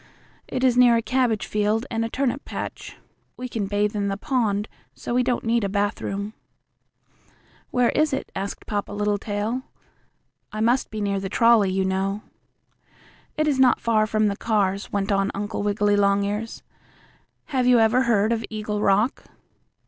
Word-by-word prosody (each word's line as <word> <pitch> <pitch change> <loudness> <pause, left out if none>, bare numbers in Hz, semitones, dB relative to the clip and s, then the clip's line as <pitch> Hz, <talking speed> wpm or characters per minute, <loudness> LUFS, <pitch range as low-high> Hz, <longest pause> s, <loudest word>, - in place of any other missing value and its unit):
It 255 - -3
is 255 -2 +4
near 245 -1 +6
a - - +1
cabbage 245 -4 +1
field 210 +3 0
and 225 -1 0
a 230 - -2
turnip 270 +2 -1
patch. - - -7 0.4
We 255 - -5
can 220 -5 -3
bathe 205 +1 0
in 200 -1 -1
the 195 0 -2
pond, 215 -4 0 0.3
so - - -5
we 250 - +3
don't 245 -1 0
need 230 0 +1
a 200 - 0
bathroom." 205 0 -2 1.4
"Where 245 -1 +2
is 305 0 +2
it?" 270 - -3
asked 195 +1 -5
Papa 205 -1 -3
Littletail. 205 +3 -1 0.9
"I 215 - -5
must 240 +4 +2
be 215 -1 -5
near 200 -1 0
the 195 0 -4
trolley, 230 -2 +4
you 190 0 0
know." 195 +2 -1 1.1
"It 305 0 +1
is 280 -3 +1
not 255 -2 +5
far 215 -2 +2
from 215 0 +1
the 200 -1 +1
cars," 200 -2 -1
went 200 0 -1
on 195 0 +1
Uncle 205 +1 -3
Wiggily 205 0 +1
Longears. 205 +2 0 0.9
"Have 255 -2 +2
you 250 -1 +6
ever 225 +3 +4
heard 220 -2 +2
of 230 -1 0
Eagle 210 -1 -3
Rock?" 210 +5 +1
215 Hz, 165 wpm, -24 LUFS, 200-235 Hz, 1.4 s, near